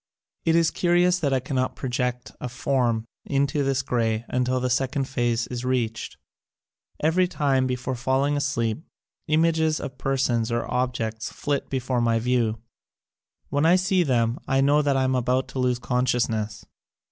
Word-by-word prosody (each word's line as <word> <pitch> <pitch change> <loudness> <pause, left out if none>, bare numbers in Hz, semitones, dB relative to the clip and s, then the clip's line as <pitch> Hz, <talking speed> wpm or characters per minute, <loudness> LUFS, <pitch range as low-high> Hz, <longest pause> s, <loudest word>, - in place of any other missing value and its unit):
It 165 - +3
is 165 -1 +3
curious 175 +1 +3
that 145 -5 0
I 135 - +2
cannot 130 0 -2
project 125 -1 -2
a 125 - -3
form 120 -3 0 0.2
into 140 +1 0
this 135 0 0
grey 115 -3 0
until 125 0 0
the 125 - 0
sec 130 +3 0
ond 135 -1 0
phase 120 -3 0
is 125 -1 -4
reached. 120 -3 -2 0.9
Every 175 +4 +3
time, 135 -6 +1
before 125 0 -2
falling 130 +3 +1
asleep, 140 -2 -1 0.4
images 160 0 +2
of 130 -2 -7
persons 125 -4 0
or 120 0 0
objects 115 -3 -2
flit 145 -1 -2
before 130 -2 -1
my 115 -1 +2
view. 115 -1 +1 0.9
When 145 +1 0
I 165 +3 +6
see 185 0 +2
them 120 -6 +1
I 135 - +2
know 145 +2 +4
that 140 -2 +1
I 130 - +2
am 130 0 +1
about 125 +1 +1
to 130 - -5
lose 125 -1 +1
conscious 125 0 +1
ness. 110 -1 -4
130 Hz, 165 wpm, -25 LUFS, 120-140 Hz, 0.9 s, I